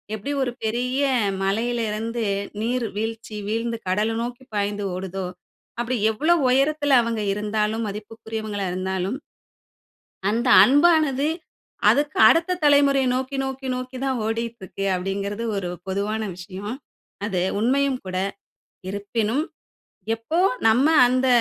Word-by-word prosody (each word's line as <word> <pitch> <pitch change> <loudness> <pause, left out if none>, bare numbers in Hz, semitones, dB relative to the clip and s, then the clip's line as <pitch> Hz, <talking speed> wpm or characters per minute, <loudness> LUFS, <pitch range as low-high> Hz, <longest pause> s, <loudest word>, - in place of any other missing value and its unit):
எப்டி 245 +7 -5
ஒரு 245 - -1
பெரிய 250 +5 0 0.4
மலையிலருந்து 225 +2 -1 0.4
நீர் 240 +1 0
வீழ்ச்சி, 225 0 -4
வீழ்ந்து 230 +1 -1
கடல 210 +4 +1
நோக்கி 245 +2 -5
பாய்ந்து 205 0 -1
ஓடுதோ, 190 0 -4 0.6
அப்டி 245 +2 -1 0.2
எவ்ளோ 310 +10 +2 0.2
உயரத்துல 285 +1 +3
அவுங்க 230 -2 -2
இருந்தாலும் 210 +2 -1
மதிப்புக்குரியவங்களா 215 0 -5
இருந்தாலும் 190 +5 -2 1.1
அந்த 235 +4 0 0.2
அன்பானது, 290 0 +4 0.6
அதுக்கு 295 +1 +1
அடுத்த 345 +5 +3
தலைமுறைய 280 -2 +5
நோக்கி, 265 +2 -2
நோக்கி, 265 0 -5
நோக்கி 255 +1 -5
தான் 260 -2 0
ஓடிட்ருக்கு 225 -4 -4
அப்டிங்கிறது 200 +4 -3
ஒரு 180 -3 -2 0.2
பொதுவான 205 +3 -1 0.2
விஷயம். 190 +5 -6 0.5
அது 185 -4 -1 0.2
உண்மையும் 265 +3 +2
கூட. 185 0 -5 0.7
இருப்பினும், 215 +7 -1 0.7
எப்போ 230 +10 -3 0.3
நம்ம 250 +6 +4 0.2
அந்த 255 +1 +1
230 Hz, 110 wpm, -23 LUFS, 205-260 Hz, 1.1 s, தலைமுறைய